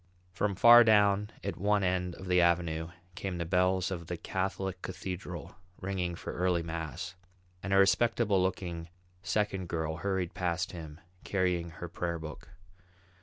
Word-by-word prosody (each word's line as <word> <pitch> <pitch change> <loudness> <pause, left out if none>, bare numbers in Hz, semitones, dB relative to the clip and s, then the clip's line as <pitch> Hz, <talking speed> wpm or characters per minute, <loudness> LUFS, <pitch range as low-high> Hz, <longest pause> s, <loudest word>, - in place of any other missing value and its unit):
From 100 +2 -1
far 120 +4 +9
down 105 -2 +4
at 100 - -3
one 100 +1 +2
end 90 -1 0
of 95 - -10
the 90 -1 +4
avenue 85 -2 +1 0.2
came 95 -1 -4
the 85 - -2
bells 90 +1 +2
of 85 -3 -5
the 90 - -3
Catholic 95 +1 -3
Cathedral 90 -2 -6 0.2
ringing 90 -2 -2
for - - -6
early 90 -1 +1
mass; 80 0 -5 0.5
and 95 - -4
a 95 - +5
respectable 105 0 +3
looking 85 -3 -2 0.3
second 95 -1 -1
girl 80 -1 -2
hurried 95 -1 -2
past 90 0 -1
him 80 -3 -9 0.2
carrying 90 -3 0
her 85 +1 -7
prayer 85 0 -3
book. 80 -1 -9
90 Hz, 150 wpm, -31 LUFS, 85-95 Hz, 0.5 s, far